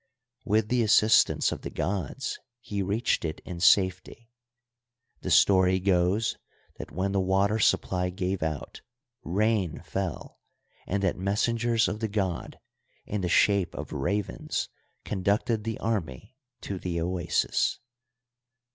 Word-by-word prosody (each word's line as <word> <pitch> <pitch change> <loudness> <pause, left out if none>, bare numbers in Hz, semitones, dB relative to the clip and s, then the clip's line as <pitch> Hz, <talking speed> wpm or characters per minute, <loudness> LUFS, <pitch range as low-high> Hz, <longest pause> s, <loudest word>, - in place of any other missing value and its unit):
With 105 +1 +1
the 125 -1 +2
assistance 110 0 +4
of - - -5
the - - -5
gods 95 - -3 0.2
he 105 -5 -4
reached 100 +5 0
it 80 -2 -3
in 90 -1 -6
safety; 95 +5 +2 0.9
the - - -4
story 95 -1 +5
goes 95 +3 +1 0.4
that - - -7
when 95 +5 -1
the 100 - +1
water 95 +3 +2
supply 90 -2 +1
gave 90 +1 -3
out 80 -3 -4 0.4
rain 100 -2 0
fell 95 -2 -4 0.5
and 100 +1 -1
that 95 - +1
messengers 115 +4 +1
of 105 - -3
the 110 - -1
god 95 -4 -3 0.5
in 105 -1 -3
the 90 - -1
shape 100 -1 +3
of - - -6
ravens 100 +8 -2 0.4
conducted 105 +3 0
the 115 -1 -2
army 105 - -3 0.3
to 95 -2 -5
the 85 -2 -3
oasis. 90 +1 0
100 Hz, 130 wpm, -27 LUFS, 90-110 Hz, 0.9 s, story